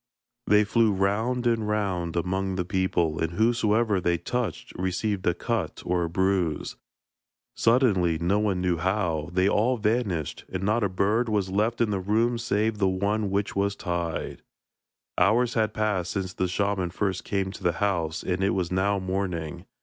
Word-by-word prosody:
They 105 +1 +5
flew 110 +1 +3
round 110 +6 0
and 115 -3 +1
round 95 -6 -1
among 95 +2 -1
the 90 -1 -1
people, 90 -4 0
and 80 +1 -1
whosoever 110 -1 +2
they 85 0 +1
touched 120 +5 -3
received 95 +2 -2
a 85 - +3
cut 100 -3 -3
or 90 0 +1
a 85 - -2
bruise. 95 -3 0 0.8
Suddenly 105 -9 +3
no 90 +5 +1
one 100 -4 0
knew 90 -2 +1
how 90 -3 -1
they 95 +2 +2
all 115 +5 +2
vanished, 105 - -1
and 95 0 -3
not 105 +3 +1
a 100 - +1
bird 105 +6 +1
was 100 -3 0
left 110 +4 0
in 115 -2 +2
the 100 - 0
room 115 +5 +1
save 110 -2 0
the 95 -2 +3
one 100 +2 0
which 100 +1 -1
was 100 0 0
tied. 85 -4 -3 0.8
Hours 115 +6 +3
had 110 -2 +1
passed 105 -5 -1
since 95 -2 -3
the 95 - -1
shaman 95 0 0
first 95 +1 -2
came 95 -1 -1
to 100 - -11
the 85 -2 +1
house, 85 -4 -1
and 90 +1 -1
it 100 - +2
was 90 -2 -1
now 100 +2 +1
morning. 90 -3 -3
95 Hz, 170 wpm, -26 LUFS, 90-105 Hz, 0.8 s, They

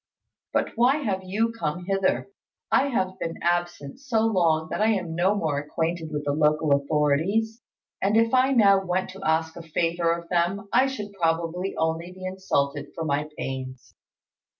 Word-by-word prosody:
But - - +1
why 245 +4 +4
have 210 -11 -2
you 215 +5 0
come 175 -5 -4
hither? 195 - 0 0.4
I 280 - +4
have 190 -7 -1
been 165 - -4
absent 175 - -1
so 255 -6 0
long 170 -8 +2
that - - -2
I 215 - +4
am 185 -7 0
no 185 +5 +2
more 155 -7 0
acquainted 160 +2 -3
with 150 -1 -3
the 145 - +1
local 150 0 +2
authorities; 155 - +1 0.4
and 205 +3 +2
if 230 +1 +3
I 260 +1 +4
now 200 -6 +5
went 185 0 -1
to 195 +1 -11
ask 160 0 0
a - - -7
favour 165 +1 0
of 170 0 -3
them, 180 +3 0
I 265 - +5
should 210 -6 -6
probably 170 +1 -1
only 160 +2 -1
be 185 0 -9
insulted 145 -7 -1
for 165 - -3
my 150 0 -1
pains. 130 -1 -6
175 Hz, 175 wpm, -25 LUFS, 160-200 Hz, 0.4 s, now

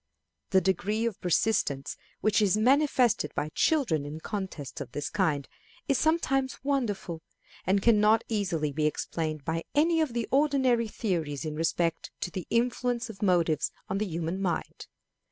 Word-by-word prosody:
The 190 -1 +4
degree 200 +5 0
of 230 -4 -3
persistence 170 -7 +1 0.3
which 215 0 +3
is 205 0 +3
manifested 250 - +3
by 150 +1 -1
children 205 - +1
in 145 +2 -6
contests 185 -8 -5
of - - -8
this 145 - -3
kind 155 -8 0 0.4
is 275 -3 +2
something 275 -5 +2
wonderful, 215 - -1 0.5
and 195 +1 +2
can 230 -3 +5
not 215 +2 +4
easily 175 -9 -1
be 150 +2 +1
explained 155 -1 -3
by 165 0 -1
any 325 +2 +4
of 300 -7 -1
the 235 -1 -2
ordinary 265 -5 +3
theories 165 - -2
in 155 - -3
respect 165 +1 -1
to 180 - -3
the 185 -1 -5
influence 240 0 0
of 195 - -16
motives 175 -5 +2 0.2
on 195 - -1
the 215 - -1
human 170 +2 -3
mind. 185 -3 -3
195 Hz, 155 wpm, -28 LUFS, 165-235 Hz, 0.5 s, can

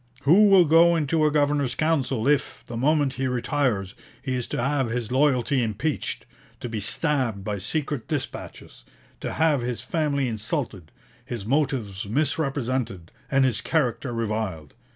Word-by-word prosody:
Who 190 +9 +6
will 195 -3 +7
go 165 +2 +5
into 155 0 +1
a - - +1
Governor's 145 -4 +1
Council 140 -6 0
if, 145 -1 +1
the 120 - -7
moment 145 +2 +2
he 135 0 -2
retires, 125 -6 -1 0.3
he 130 0 -3
is 125 -2 -2
to - - -3
have 135 0 0
his 120 -1 -3
loyalty 130 -1 +2
impeached; 120 +7 -2 0.3
to - - -5
be 115 -2 -4
stabbed 125 -3 -1
by 105 0 -3
secret 140 - -3
dispatches; 145 - -6 0.4
to - - -4
have 155 -5 +2
his 120 -1 -3
family 145 -5 0
insulted; 110 - -3 0.3
his 115 -5 -6
motives 115 -7 -1
misrepresented, 130 - -1 0.2
and 135 -2 +3
his 130 - 0
character 135 -4 0
reviled? 110 - -3
130 Hz, 150 wpm, -25 LUFS, 115-150 Hz, 0.4 s, will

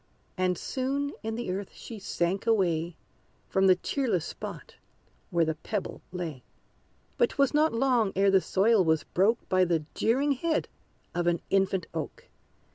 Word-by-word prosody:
And 185 -1 +1
soon 275 +2 -2
in 225 0 -3
the 235 -5 -3
earth 195 +1 -4
she 225 -3 -9
sank 190 +1 -1
away 175 -6 +1 0.5
From 190 0 +3
the 185 - +7
cheerless 220 - -1
spot - - -8 0.5
where 170 -1 +2
the 160 - 0
Pebble 190 +6 -4
lay. 165 -7 -5 0.8
But 480 - +4
'twas 275 0 +1
not 305 +2 +4
long 235 -4 +2
ere 195 +1 +4
the 190 -1 +5
soil 200 +2 +3
was 160 -2 +2
broke 205 +6 +1
By 185 0 +3
the 165 -3 +1
jeering 270 +6 +2
head 315 +4 0 0.5
of 175 0 -1
an 170 -1 +2
infant 190 -2 +2
oak! 160 -3 -6
195 Hz, 155 wpm, -28 LUFS, 175-235 Hz, 0.8 s, the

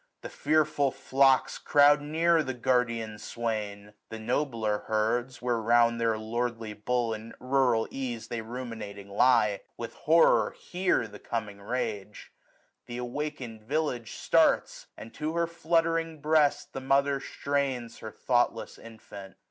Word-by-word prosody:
The - - -7
fearful 150 -2 +1
flocks 135 0 +2
Croud 145 0 +5
near 165 +3 +2
the 130 -4 -4
guardian 115 -3 0
swain; 105 -3 -4 0.2
the 115 - -6
nobler 110 -3 -1
herds. 120 +4 -1
Where 120 -2 +1
round 115 +1 +3
their 115 -1 +1
lordly 115 0 -3
bull, 115 +2 -1
in 110 +1 -8
rural 125 -3 +2
ease, 125 -4 -4
930 - - -2
They 115 - -3
ruminating 110 -4 -7
lie, 105 -2 +3 0.2
with 115 -1 -6
horror 165 +2 +3
hear 180 -9 0
The 105 -1 -12
coming 105 -3 -5
rage. 105 -2 -4 0.6
Th* 120 - -6
awaken'd 125 -3 -5
village 125 -2 -2
starts; - - +2
And 115 - -10
to 155 +2 -3
her 170 0 +2
fluttering 165 -1 0
breast 145 -1 +2
the 135 - -5
mother 140 +1 +2
strains 135 -5 -3
Her 110 - -7
thoughtless 120 0 -1
infant. 100 -4 -12
120 Hz, 135 wpm, -28 LUFS, 110-140 Hz, 0.6 s, Croud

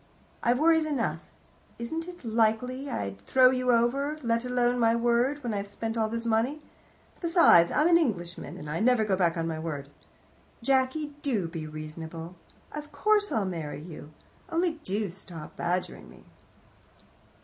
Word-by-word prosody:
I've 240 +1 +2
worries 320 +1 +4
enough. 275 -7 -1 0.6
It - - -6
isn't 330 +4 -6
likely 230 +4 +1
I'd 100 - -4
throw 255 - +5
you 255 -1 -1
over, 270 +6 +1
let 230 0 +1
alone 245 0 +1
my 230 -1 +4
word, 240 +4 +1
when 235 -3 -2
I've 200 0 -3
spent 225 +2 -4
all 220 -1 +1
this 230 +1 -3
money. 230 +6 +1 0.6
Besides, 335 - +5
I'm 300 - +3
an 340 -1 +6
Englishman, 175 - -3
and 150 - -8
I 150 +3 -2
never 230 -1 +3
go 200 -3 +2
back 175 -2 +1
on 165 0 -1
my 160 -1 -3
word. 145 -4 -5 0.7
Jacky, 270 +3 +1
do 225 - 0
be 165 -2 -6
reasonable. 160 +2 -7 0.4
Of 300 0 -7
course 415 +7 +2
I'll 215 -3 +1
marry 165 -6 -4
you. 155 -2 -10 0.4
Only 330 -1 0
do 205 +2 -1
stop 175 -3 -10
badgering 180 +1 -3
me." - - -16
230 Hz, 160 wpm, -28 LUFS, 175-275 Hz, 0.7 s, an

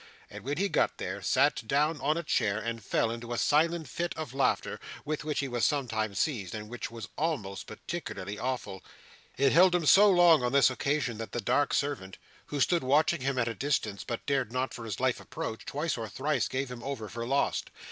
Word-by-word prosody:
And - - -9
when 145 +2 -2
he 200 +3 +2
got - - +1
there, 100 +2 -4
sat 130 +4 +2
down 150 +2 +1
in 150 +3 +1
a 170 - -2
chair, 100 -9 +1
and 115 0 -4
fell 115 - +1
into 115 +1 -5
a - - -2
silent 160 +3 +2
fit 170 +7 -3
of 155 -6 -5
laughter, 135 0 0 0.3
with 150 0 -2
which 150 -1 -1
he 140 - -2
was 120 -2 -2
sometimes 110 -8 0
seized, 110 - -1
and 105 0 -6
which 120 0 -5
was 115 -3 -8
always 105 - -2
particularly 105 - -6
awful. 120 -7 -3 0.5
It 135 +1 +4
held 180 +3 +6
him 175 -3 +1
so 205 +7 +7
long 175 -5 +6
on 125 +1 -1
this 140 -1 +5
occasion 130 -3 -1
that 115 - -6
the - - -1
dark 145 +4 +1
servant, 130 -10 -2 0.3
who 145 - -3
stood 170 +3 +2
watching 150 +4 +3
him 135 0 -1
at 120 -2 +1
a 115 - -1
distance, 115 -7 -1
but 115 - -5
dared 135 -5 0
not 130 +1 -1
for 115 - -7
his 105 -4 -4
life 130 -1 +1
approach, 110 - -6
twice 150 +1 -1
or 110 -1 -4
thrice 145 +7 0
gave 130 0 -3
him 120 -1 -7
over 120 -4 -4
for 115 +2 -5
lost. 140 +2 0
130 Hz, 215 wpm, -29 LUFS, 115-150 Hz, 0.5 s, so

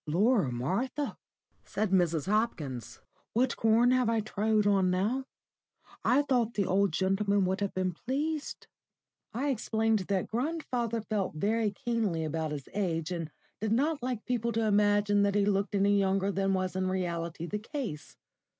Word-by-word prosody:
"Lor, 195 - +2
Martha!" 200 - -2 0.5
said 210 -1 -2
Mrs. 170 -5 +2
Hopkins. 155 - -2 0.3
"What 245 +2 +2
corn 225 +2 +4
have 255 -2 +3
I 230 -1 +2
trod 215 0 +1
on 195 -2 +3
now? 210 +9 0 0.8
I 275 +4 +4
thought 245 -5 +1
the 200 - +1
old 195 0 +2
gentleman 195 +3 +1
would 190 +2 -1
have 200 - -2
been 185 -1 0
pleased." 295 - -3 0.7
I 265 +6 -1
explained 225 -2 +1
that 195 -2 0
grandfather 245 -3 -2
felt 205 -6 -2
very 215 +6 +1
keenly 205 -5 -1
about 160 0 -2
his 145 -3 -5
age, 175 -4 -1
and 165 -3 -3 0.3
did 220 +1 0
not 290 +4 +1
like 245 -3 -3
people 235 -2 -1
to 225 +1 +1
imagine 205 0 +3
that 200 0 +2
he 205 -1 +3
looked 200 0 0
any 200 +1 +3
younger 195 0 +1
than 195 0 +1
was 185 0 -2
in 185 0 0
reality 170 -3 -2
the 210 +4 -3
case. 225 - -6
205 Hz, 160 wpm, -30 LUFS, 185-230 Hz, 0.8 s, corn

